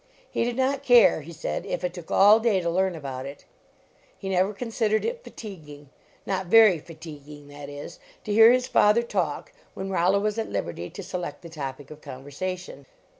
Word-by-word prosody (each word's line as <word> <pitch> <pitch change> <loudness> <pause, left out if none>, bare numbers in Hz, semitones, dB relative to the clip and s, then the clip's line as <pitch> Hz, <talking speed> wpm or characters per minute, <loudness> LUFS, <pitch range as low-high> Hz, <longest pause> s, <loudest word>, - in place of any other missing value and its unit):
Me - - +1
did 240 0 -2
not 265 +1 +1
care, 245 - +5
he 160 +3 -11
said, 165 - -4
if 175 - -4
it 180 -1 -2
took 175 -3 -10
all 205 +3 +6
day 225 -4 +2
to 170 -1 -1
learn 190 +1 +1
about 135 -4 -6
it. 140 +1 -11 0.7
He 195 - -6
never 190 +1 +2
considered 220 0 -1
it 475 +1 -3
fatiguing 150 - -11 0.3
not 190 -2 -2
very 215 -3 +6
fatiguing, 150 -3 -12
that 145 0 -9
is 145 0 -9 0.2
to 210 - -3
hear 225 +2 +8
his 250 0 +2
father 215 +1 +4
talk, 180 -10 -2 0.2
when 195 0 -5
Rollo 185 +2 +2
was 210 +2 -1
at 225 - -3
liberty 85 -3 -4
to 195 - -9
select 180 -1 -6
the 170 - -9
topic 140 -3 -7
of 155 0 -11
conversation. 145 +2 -7
180 Hz, 185 wpm, -25 LUFS, 145-215 Hz, 0.7 s, hear